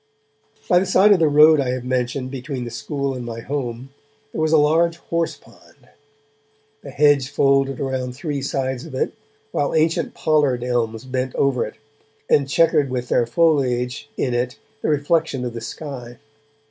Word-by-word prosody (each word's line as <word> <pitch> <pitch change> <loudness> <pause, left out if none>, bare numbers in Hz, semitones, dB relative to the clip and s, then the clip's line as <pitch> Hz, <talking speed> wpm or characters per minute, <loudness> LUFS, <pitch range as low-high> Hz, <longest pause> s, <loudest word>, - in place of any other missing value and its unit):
By 180 - +5
the 190 - -1
side 195 +2 +5
of 200 - +5
the 160 - +4
road 150 +1 +6
I 135 -2 0
have 125 0 -3
mentioned, 125 +1 -2
between 130 -1 -5
the 120 - -6
school 140 +3 -3
and 125 -1 -6
my 115 -1 -6
home, 130 -1 -5 0.4
there - - -3
was 155 0 +1
a 160 - +6
large 165 +3 +3
horse 170 -1 -2
pond. - - -22 0.9
The 140 - -10
hedge 140 -1 +3
folded 135 -1 +2
around 130 -2 -3
three 145 0 -4
sides 130 -2 -2
of - - -9
it, - - -1 0.4
while 145 - -1
ancient 160 +1 +1
pollard 145 -6 +1
elms 115 -2 -1
bent 130 0 -3
over 135 -5 +1
it, - - -11 0.5
and 140 -1 +2
chequered 150 -3 +3
with 125 -1 -3
their 120 - +2
foliage 130 -3 +1
in 125 - -1
it 120 +1 -1 0.2
the - - -1
reflection 150 -3 0
of 120 - -4
the 115 - -6
sky. 125 -2 -7
135 Hz, 170 wpm, -21 LUFS, 125-150 Hz, 0.9 s, road